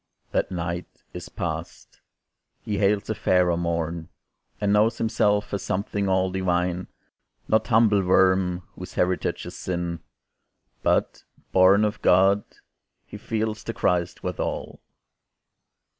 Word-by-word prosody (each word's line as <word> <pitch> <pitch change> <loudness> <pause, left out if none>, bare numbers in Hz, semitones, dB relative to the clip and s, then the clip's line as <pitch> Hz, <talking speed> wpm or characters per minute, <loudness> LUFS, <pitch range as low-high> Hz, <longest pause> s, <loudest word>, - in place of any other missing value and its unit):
That - - 0
night 85 -1 -5
is - - -8
past. - - -6 0.6
He 105 -2 -2
hails 100 0 +2
a - - +1
fairer 90 -4 +2
morn, 85 0 -2 0.5
And 105 -1 +1
knows 110 +2 +3
himself 105 -2 +1
a 100 - 0
something 100 +1 -2
all 95 0 +2
divine; 90 -1 -1 0.6
Not 110 - +2
humble 110 -3 +4
worm 95 -1 +3
whose 90 0 -10
heritage 90 0 0
is - - -8
sin, 85 -2 -3 0.8
But, - - 0 0.3
born 95 +3 +5
of 105 - -3
God, 95 +3 +4 0.6
he - - -9
feels 110 0 -3
the - - -5
Christ 90 -1 0
withal. 90 -1 -4
95 Hz, 120 wpm, -25 LUFS, 90-105 Hz, 0.8 s, born